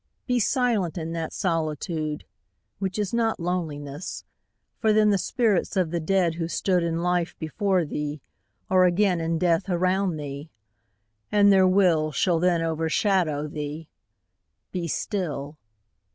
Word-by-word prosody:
Be 250 Hz, -1 st, +1 dB
silent 230 Hz, -, +1 dB
in 165 Hz, -1 st, -4 dB
that 165 Hz, -1 st, -3 dB
solitude 155 Hz, -3 st, -2 dB, 0.5 s
Which 190 Hz, -1 st, -2 dB
is 205 Hz, -1 st, -2 dB
not 230 Hz, -3 st, +1 dB
loneliness 160 Hz, -3 st, -4 dB, 0.6 s
for 220 Hz, -2 st, +3 dB
then 210 Hz, 0 st, +4 dB
The 200 Hz, -, +2 dB
spirits 215 Hz, -3 st, 0 dB
of 180 Hz, -4 st, +1 dB
the 170 Hz, -, -1 dB
dead 175 Hz, 0 st, +1 dB
who 165 Hz, 0 st, -3 dB
stood 180 Hz, +1 st, +1 dB
In 170 Hz, 0 st, -1 dB
life 180 Hz, -1 st, 0 dB
before 185 Hz, +2 st, 0 dB
thee 150 Hz, 0 st, -4 dB, 0.5 s
are 185 Hz, -1 st, +4 dB
again 180 Hz, -1 st, +2 dB
In 165 Hz, 0 st, 0 dB
death 175 Hz, +2 st, +1 dB
around 185 Hz, 0 st, +1 dB
thee 145 Hz, +1 st, -7 dB, 0.8 s
and 205 Hz, -1 st, +5 dB
their 190 Hz, -1 st, +5 dB
will 175 Hz, -5 st, +3 dB
Shall 170 Hz, +1 st, +1 dB
overshadow 165 Hz, -1 st, +1 dB
thee: 150 Hz, +1 st, -6 dB, 0.8 s
be 175 Hz, -2 st, -3 dB
still. 150 Hz, -5 st, -3 dB
175 Hz, 135 wpm, -25 LUFS, 160-195 Hz, 0.8 s, and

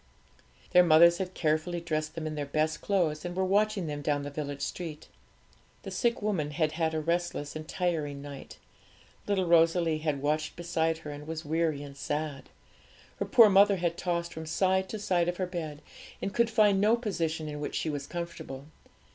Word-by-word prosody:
Their 180 Hz, -, +8 dB
mothers 170 Hz, +1 st, +6 dB
had 185 Hz, -1 st, -4 dB
carefully 155 Hz, +2 st, 0 dB
dressed 155 Hz, -2 st, -3 dB
them 165 Hz, -1 st, -4 dB
in 155 Hz, -, -3 dB
their 145 Hz, -2 st, -4 dB
best 155 Hz, +2 st, 0 dB
clothes, 165 Hz, -7 st, 0 dB
and 175 Hz, 0 st, -5 dB
were 190 Hz, 0 st, +1 dB
watching 205 Hz, 0 st, +2 dB
them 145 Hz, -1 st, -4 dB
down 145 Hz, 0 st, 0 dB
the 145 Hz, -, -5 dB
village 145 Hz, -1 st, -4 dB
street. 160 Hz, -4 st, -5 dB, 0.8 s
The -, -, -7 dB
sick 235 Hz, -4 st, 0 dB
woman 185 Hz, -9 st, 0 dB
had 155 Hz, +1 st, 0 dB
had 160 Hz, 0 st, -1 dB
a -, -, +1 dB
restless 170 Hz, -2 st, -2 dB
and 155 Hz, 0 st, -6 dB
tiring 160 Hz, -7 st, -2 dB
night. 140 Hz, -1 st, -9 dB, 0.7 s
Little 195 Hz, -2 st, +1 dB
Rosalie 165 Hz, -1 st, +3 dB
had 150 Hz, -3 st, -2 dB
watched 155 Hz, +1 st, 0 dB
beside 165 Hz, -2 st, 0 dB
her, 150 Hz, -2 st, -8 dB
and 145 Hz, +1 st, -9 dB
was 160 Hz, 0 st, -5 dB
weary 155 Hz, -1 st, 0 dB
and 140 Hz, -1 st, -10 dB
sad. 145 Hz, 0 st, -4 dB, 0.7 s
Her -, -, -2 dB
poor 230 Hz, -3 st, +8 dB
mother 200 Hz, 0 st, +6 dB
had 170 Hz, -2 st, -1 dB
tossed 170 Hz, -1 st, -2 dB
from 160 Hz, 0 st, -7 dB
side 190 Hz, +3 st, +1 dB
to 220 Hz, -, -4 dB
side 180 Hz, -4 st, +1 dB
of 175 Hz, -, -3 dB
her 185 Hz, -, 0 dB
bed 160 Hz, -5 st, -6 dB, 0.4 s
and 195 Hz, -, -3 dB
could 235 Hz, -1 st, +2 dB
find 210 Hz, -4 st, +4 dB
no 215 Hz, +3 st, +5 dB
position 165 Hz, -9 st, -2 dB
in 150 Hz, -1 st, -5 dB
which 145 Hz, -, -4 dB
she 155 Hz, -, -1 dB
was 145 Hz, -1 st, -5 dB
comfortable. 170 Hz, -6 st, -6 dB
165 Hz, 190 wpm, -29 LUFS, 150-180 Hz, 0.8 s, Their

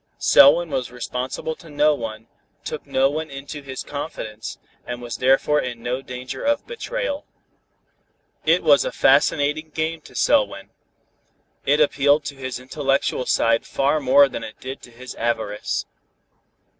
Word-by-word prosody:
Selwyn 175 Hz, -, +6 dB
was 130 Hz, -3 st, -2 dB
responsible 125 Hz, +5 st, -4 dB
to 165 Hz, -, -15 dB
no 150 Hz, +1 st, +3 dB
one, 115 Hz, -4 st, -6 dB, 0.4 s
took -, -, -6 dB
no 135 Hz, +1 st, +3 dB
one 155 Hz, +3 st, -3 dB
into 140 Hz, +2 st, -7 dB
his 135 Hz, -1 st, -6 dB
confidence, 110 Hz, -7 st, -6 dB, 0.3 s
and 120 Hz, 0 st, -6 dB
was 120 Hz, -1 st, -6 dB
therefore 135 Hz, +3 st, +3 dB
in 120 Hz, -2 st, -6 dB
no 125 Hz, +2 st, -2 dB
danger 125 Hz, -1 st, -7 dB
of 290 Hz, 0 st, +1 dB
betrayal. 485 Hz, -9 st, -4 dB, 1.2 s
It -, -, +3 dB
was -, -, +5 dB
a -, -, -2 dB
fascinating 150 Hz, -, +2 dB
game 160 Hz, +1 st, -2 dB
to -, -, -16 dB
Selwyn. -, -, +1 dB, 1.0 s
It 145 Hz, +2 st, +4 dB
appealed 145 Hz, 0 st, +3 dB
to 140 Hz, -, -5 dB
his 130 Hz, -2 st, -5 dB
intellectual 135 Hz, 0 st, -1 dB
side 115 Hz, 0 st, +2 dB
far 140 Hz, +3 st, +1 dB
more 140 Hz, +1 st, +6 dB
than 115 Hz, -, -6 dB
it 110 Hz, -1 st, -9 dB
did 130 Hz, +1 st, -7 dB
to -, -, -13 dB
his 125 Hz, +1 st, -10 dB
avarice. 110 Hz, -3 st, -2 dB
135 Hz, 145 wpm, -22 LUFS, 125-150 Hz, 1.2 s, Selwyn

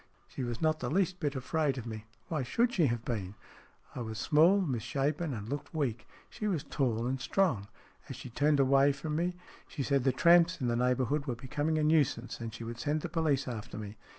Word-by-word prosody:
She 130 Hz, -, -5 dB
was 120 Hz, +3 st, -4 dB
not 155 Hz, 0 st, +2 dB
the 125 Hz, -, -3 dB
least 180 Hz, +2 st, +1 dB
bit 145 Hz, -3 st, -1 dB
afraid 140 Hz, +1 st, 0 dB
of 120 Hz, -, -5 dB
me. 110 Hz, -2 st, -6 dB, 0.2 s
Why 155 Hz, -4 st, -1 dB
should 235 Hz, -, +1 dB
she 165 Hz, -6 st, +3 dB
have 120 Hz, -1 st, -2 dB
been? 105 Hz, -5 st, -3 dB, 0.6 s
I -, -, -6 dB
was 110 Hz, -2 st, -5 dB
small, 160 Hz, -, +5 dB
misshapen, 140 Hz, -, -1 dB
and 110 Hz, -4 st, -5 dB
looked 145 Hz, +5 st, -5 dB
weak. 125 Hz, -7 st, -2 dB, 0.2 s
She 215 Hz, -3 st, -4 dB
was 170 Hz, -8 st, 0 dB
tall 120 Hz, -6 st, -1 dB
and 130 Hz, +1 st, -2 dB
strong. 135 Hz, -, +1 dB, 0.4 s
As -, -, -5 dB
she 130 Hz, -, -9 dB
turned 145 Hz, +4 st, +2 dB
away 135 Hz, +1 st, +5 dB
from 150 Hz, +2 st, -4 dB
me, 175 Hz, +2 st, 0 dB, 0.3 s
she 145 Hz, -, -4 dB
said 140 Hz, -1 st, +1 dB
the 135 Hz, -, +3 dB
tramps 170 Hz, +6 st, +5 dB
in 125 Hz, -3 st, 0 dB
the 120 Hz, -, +1 dB
neighbourhood 125 Hz, +4 st, +1 dB
were 125 Hz, -, -1 dB
becoming 145 Hz, +6 st, -1 dB
a 155 Hz, -, +1 dB
nuisance, 150 Hz, -6 st, +1 dB
and 115 Hz, -1 st, -5 dB
she 115 Hz, -, -8 dB
would 115 Hz, 0 st, -6 dB
send 150 Hz, +4 st, 0 dB
the 175 Hz, -, -4 dB
police 155 Hz, -5 st, +1 dB
after 115 Hz, -2 st, -6 dB
me. 105 Hz, -1 st, -7 dB
140 Hz, 215 wpm, -31 LUFS, 120-155 Hz, 0.6 s, small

